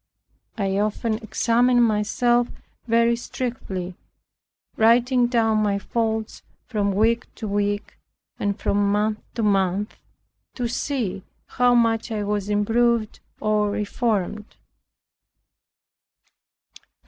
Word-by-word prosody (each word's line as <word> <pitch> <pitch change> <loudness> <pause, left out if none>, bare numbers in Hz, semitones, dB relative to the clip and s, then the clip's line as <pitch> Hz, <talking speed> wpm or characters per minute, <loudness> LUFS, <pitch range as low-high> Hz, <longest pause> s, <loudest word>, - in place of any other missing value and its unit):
I 195 -2 0
often 215 +1 -1
examined 240 +2 +2
myself 235 +2 +2 0.4
very 230 +1 +3
strictly, 195 -7 -5 0.8
writing 240 +2 +4
down 225 -3 +2
my 205 -1 +1
faults 220 +1 -2 0.2
from 205 -4 -1
week 230 +3 +2
to 220 - -6
week, 205 0 -2 0.4
and 200 -1 -1
from 200 0 +1
month 210 +1 0 0.2
to 230 - -1
month, 195 0 +1 0.6
to 245 -2 -2
see 240 -5 -2 0.2
how 245 0 +2
much 230 -1 +2
I 210 -2 -2
was 205 0 -2
improved 225 +2 +1 0.2
or 210 -1 +1
reformed. 210 -1 -1
220 Hz, 100 wpm, -23 LUFS, 205-235 Hz, 0.8 s, writing